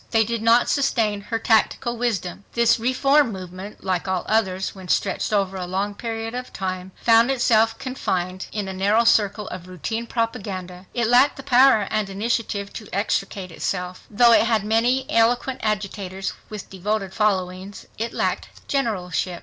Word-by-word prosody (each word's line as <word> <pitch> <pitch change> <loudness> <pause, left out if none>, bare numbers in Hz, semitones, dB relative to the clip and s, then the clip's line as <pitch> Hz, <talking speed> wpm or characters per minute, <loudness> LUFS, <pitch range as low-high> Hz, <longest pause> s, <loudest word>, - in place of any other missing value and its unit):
They 225 -1 +3
did 230 0 -3
not 230 +2 +4
sustain 225 -7 +1
her 225 +3 -3
tactical 225 +2 +1
wisdom. 200 -6 -2
This 235 0 +3
reform 265 +2 +3
movement, 185 +1 -9
like 185 -1 -1
all 185 -1 -1
others 190 -4 0
when 190 -2 -11
stretched - - 0
over 195 -2 +1
a 180 -1 -4
long 195 +3 -2
period 225 +1 -5
of 250 0 -6
time, 185 -1 -4
found 230 +1 +5
itself 225 -4 +3
confined 185 -8 -3
in 210 -2 -3
a 190 - -4
narrow 200 +5 +2
circle 210 -2 +2
of 180 -1 -8
routine 220 +6 -4
propaganda. 195 -6 -4
It 240 -1 +1
lacked 245 +5 +4
the 275 - -8
power 255 -5 +5
and 215 -2 0
initiative 205 0 -2
to 215 - -8
extricate 195 -2 -2
itself. 180 +2 -4
Though 235 +3 +5
it 230 - +5
had 220 -3 +2
many 240 +4 +2
eloquent 240 +3 +2
agitators 195 -2 -3 0.2
with 210 -2 -8
devoted 195 0 -2
followings, 190 -2 -1
it 230 +1 -2
lacked - - -2 0.2
generalship. 185 - -1
215 Hz, 160 wpm, -23 LUFS, 190-230 Hz, 0.2 s, found